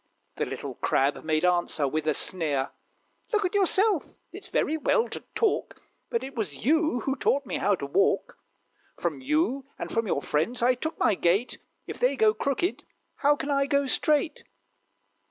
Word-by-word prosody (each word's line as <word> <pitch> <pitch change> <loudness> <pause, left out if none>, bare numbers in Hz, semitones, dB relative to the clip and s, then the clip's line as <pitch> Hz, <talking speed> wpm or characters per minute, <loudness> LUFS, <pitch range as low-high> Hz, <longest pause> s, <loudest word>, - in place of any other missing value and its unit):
The - - -1
little - - -5
Crab 135 +2 0
made 155 +1 +1
answer, 175 -5 +1
with 155 +3 -2
a 155 - +2
sneer, 150 -7 +1 0.6
"Look 425 -3 +2
at 360 - -1
yourself! 395 -2 +2 0.2
It's - - -7
very 315 - +1
well 455 +9 +2
to - - -5 0.2
talk, 445 -3 0 0.3
But 465 - -1
it 270 - -7
was 200 - -4
you 310 -3 +2
who 270 +4 -1
taught 280 +1 +1
me - - -3
how 205 - +2
to 140 - -6
walk: 140 +8 +1 0.6
From - - -3
you, 275 -1 0
and - - -5
from 230 -1 0
your 145 - -1
friends, 215 +12 0
I 250 +1 +5
took 315 +6 -4
my - - +3
gait; 195 +6 +1 0.3
If - - -7
they - - +2
go 435 -1 +4
crooked, 310 - -1 0.3
how 290 +1 +3
can 285 0 -3
I 275 0 +2
go 280 0 +2
straight?" 300 +3 +1
270 Hz, 175 wpm, -27 LUFS, -, 0.6 s, I